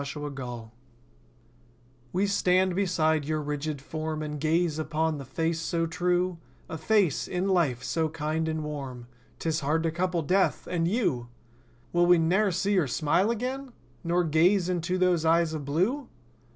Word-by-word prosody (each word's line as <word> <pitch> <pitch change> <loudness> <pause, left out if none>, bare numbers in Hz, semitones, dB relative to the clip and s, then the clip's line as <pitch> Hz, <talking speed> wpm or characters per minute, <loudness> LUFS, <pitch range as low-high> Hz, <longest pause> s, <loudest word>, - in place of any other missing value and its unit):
HUGHES 135 -6 -6 1.4
We 190 +3 +1
stand 185 -2 +2
beside 160 -5 +1
your 155 +1 -1
rigid 150 0 -3
form 155 +2 -4
And 150 -1 -5
gaze 160 +1 +1
upon 155 0 -1
the 135 - -7
face 165 +5 -1
so 165 0 -1
true; 180 +1 0 0.3
A - - -6
face, 200 -8 +2
in 180 +1 -1
life, 155 -10 +1
so 160 +5 0
kind 155 +1 -2
and 155 -1 -2
warm— 135 -5 -6 0.3
'Tis 160 -1 -1
hard 155 +3 0
to 165 - 0
couple 175 0 -1
Death—and 180 0 +1
you! 170 - 0 0.7
Will 175 0 +4
we 175 0 +7
ne'er 185 +6 +2
see 195 +4 0
your 180 -7 +2
smile 160 - +1
again? 255 +3 -3 0.3
Nor 175 +1 +1
gaze 175 +4 +3
into 180 +1 -1
those 180 -3 +2
eyes 165 0 +3
of 150 -3 -4
blue? 200 - 0
165 Hz, 150 wpm, -27 LUFS, 150-180 Hz, 1.4 s, we